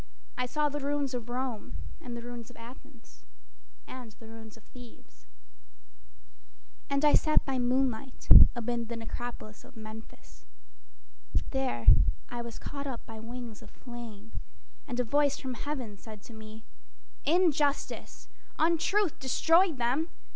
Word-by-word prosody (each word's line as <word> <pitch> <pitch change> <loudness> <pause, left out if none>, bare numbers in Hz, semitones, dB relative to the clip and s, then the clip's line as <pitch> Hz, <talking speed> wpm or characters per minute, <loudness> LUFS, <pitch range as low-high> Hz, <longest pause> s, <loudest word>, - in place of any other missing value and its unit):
I 250 - -1
saw 300 +3 +1
the 295 0 -3
ruins 285 -1 -1
of 240 -1 -4
Rome 245 -3 -3 0.3
And 240 -1 -6
the 235 - -7
ruins 240 -1 -7
of 245 - -15
Athens, 240 +1 -14 0.6
And 245 -4 -9
the 225 - -15
ruins 225 -1 -11
of 225 - -18
Thebes. - - -15 1.6
And 280 +1 +2
I 295 - +6
sat 310 - +4
by 265 -2 -1
moonlight 255 0 0 0.3
amid 240 0 -2
the 235 - -3
necropolis 225 -1 -6
of - - -15
Memphis. 215 - -11 1.0
There 265 - -1 0.4
I 240 0 -4
was 235 -1 -7
caught 280 0 -5
up 250 -4 -5
by 225 -1 -9
wings 235 -1 -7
of - - -12
flame, 230 -4 -10 0.6
And 250 -2 -3
a - - +4
voice 285 +3 +2
from 260 -2 -4
heaven 250 -6 -4
said 215 -1 -11
to 235 - -12
me: 220 0 -10 0.6
"Injustice, 300 -3 +1 0.3
Untruth 335 +3 +2
destroyed 325 +5 +4
them. 255 +8 +1
245 Hz, 140 wpm, -30 LUFS, 225-280 Hz, 1.6 s, I